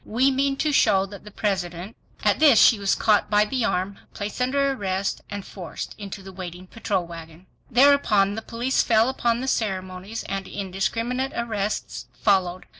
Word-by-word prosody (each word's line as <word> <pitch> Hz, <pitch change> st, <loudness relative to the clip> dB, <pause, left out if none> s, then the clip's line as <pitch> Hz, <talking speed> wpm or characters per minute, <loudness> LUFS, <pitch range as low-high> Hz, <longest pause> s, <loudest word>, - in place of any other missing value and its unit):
We 255 Hz, +5 st, +2 dB
mean 275 Hz, +1 st, 0 dB
to 305 Hz, -, 0 dB
show 195 Hz, -8 st, +4 dB
that 200 Hz, +1 st, -11 dB
the -, -, -9 dB
President... 190 Hz, -1 st, -3 dB, 0.3 s
." 295 Hz, -5 st, +5 dB
She 220 Hz, 0 st, +6 dB
was 200 Hz, -1 st, +1 dB
caught 210 Hz, -2 st, +2 dB
by 210 Hz, 0 st, +4 dB
the 250 Hz, +2 st, -2 dB
arm, 190 Hz, -1 st, -2 dB, 0.2 s
placed 210 Hz, +3 st, -5 dB
under 275 Hz, +2 st, +2 dB
arrest, 195 Hz, -6 st, -2 dB
and 200 Hz, -1 st, -6 dB
forced 180 Hz, -4 st, -7 dB
into 195 Hz, -1 st, -8 dB
the 190 Hz, -, -10 dB
waiting 180 Hz, -1 st, -8 dB
patrol 195 Hz, -2 st, -2 dB
wagon. 165 Hz, +1 st, -11 dB, 0.2 s
Thereupon 245 Hz, -7 st, +4 dB
the 225 Hz, -, -4 dB
police 240 Hz, +4 st, 0 dB
fell 225 Hz, +1 st, +3 dB
upon 240 Hz, -2 st, 0 dB
the 265 Hz, -, -4 dB
ceremonies, 190 Hz, -2 st, -3 dB
and 195 Hz, -1 st, -4 dB
indiscriminate 230 Hz, +7 st, -2 dB
arrests 200 Hz, -, -3 dB
followed. 185 Hz, -3 st, +1 dB
205 Hz, 165 wpm, -24 LUFS, 190-235 Hz, 0.3 s, She